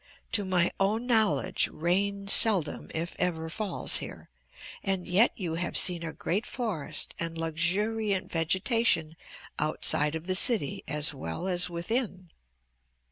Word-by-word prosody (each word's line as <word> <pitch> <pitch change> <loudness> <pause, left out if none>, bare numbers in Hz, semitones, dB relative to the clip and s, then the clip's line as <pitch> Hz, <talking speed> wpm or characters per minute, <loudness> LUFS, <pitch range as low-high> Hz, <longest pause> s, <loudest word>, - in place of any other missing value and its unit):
To 205 - +2
my 185 -2 +2
own 210 +5 +1
knowledge 220 -6 +2
rain 200 +4 0
seldom, 200 -6 +1
if 165 +2 -3
ever, 160 -2 -1
falls 210 +2 +1
here, - - -8 0.5
and 190 -2 -1
yet 195 +7 +5
you 175 -7 -3
have 175 +2 -2
seen 175 -2 +3
a 165 -1 -4
great 195 +7 -2
forest 185 - -3
and 165 0 -3
luxuriant 190 +5 0
vegetation 170 0 +1 0.4
outside 150 0 +2
of 160 +1 -5
the 185 - 0
city 190 - +2
as 150 +1 0
well 130 - -5
as 180 -1 +3
within. 185 0 -2
180 Hz, 135 wpm, -29 LUFS, 165-205 Hz, 0.5 s, yet